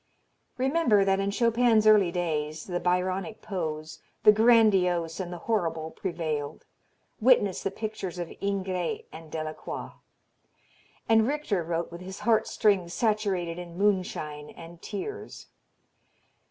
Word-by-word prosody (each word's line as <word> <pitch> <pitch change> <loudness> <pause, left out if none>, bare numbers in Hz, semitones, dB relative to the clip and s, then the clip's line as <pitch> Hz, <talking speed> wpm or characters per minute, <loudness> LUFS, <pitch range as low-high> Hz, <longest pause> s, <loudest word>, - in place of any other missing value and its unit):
Remember 260 -7 +3
that 195 0 +2
in 195 0 0
Chopin's 230 0 +3
early 210 -5 +6
days 155 -3 -2
the 175 -2 -2
Byronic 185 +4 -1
pose, 160 -6 -4 0.2
the 210 - +9
grandiose 200 -7 +3
and 180 -2 -4
the 175 - -5
horrible 165 -7 -1
prevailed 160 -5 -4 0.5
witness 220 -5 +3
the - - -1
pictures 195 -3 -5
of 175 -2 -5
Ingres 190 -3 -2
and 160 -1 -11
Delacroix 155 -1 -5 1.2
and 225 0 +4
Richter 275 - -1
wrote 170 +1 -3
with 170 +1 -9
his 190 +1 -8
heart 225 -2 +2
strings 190 -5 +1
saturated 195 -6 0
in 175 -1 -9
moonshine 180 -7 -1
and 170 0 -12
tears. 410 - -6
185 Hz, 125 wpm, -27 LUFS, 170-215 Hz, 1.2 s, the